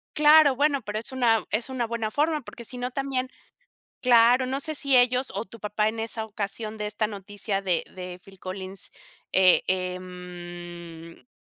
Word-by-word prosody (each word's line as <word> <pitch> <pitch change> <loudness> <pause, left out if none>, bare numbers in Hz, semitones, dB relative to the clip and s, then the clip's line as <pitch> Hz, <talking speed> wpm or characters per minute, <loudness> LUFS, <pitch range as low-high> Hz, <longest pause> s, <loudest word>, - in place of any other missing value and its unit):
Claro, 300 -2 +7
bueno, 285 -1 +2
pero, 210 0 -4
es 225 - -5
una 235 -4 +3
es 225 +4 +1
una 250 -2 -1
buena 225 -1 -2
forma, 300 +5 +1
porque, 235 -2 -11
si 250 +2 -6
no 250 +1 -2
también 265 -1 -2 0.7
claro. 245 +1 +5
No 270 +2 -2
sé 310 +2 -2
si 275 -2 +3
ellos, 250 +1 +3
o, 205 +3 -2
tu 230 +1 -13
papá 210 +1 0
en 225 +1 -4
esa 225 0 -3
ocasión, 215 +1 -5
de 210 - -2
esta 210 +1 -1
noticia 205 0 -4
de 180 -4 0
de 180 -1 -7
Phill 195 -1 -16
Collins, 190 +1 -6 0.4
eh, 185 -1 +6
em 175 -2 -6
220 Hz, 175 wpm, -26 LUFS, 185-255 Hz, 0.7 s, Claro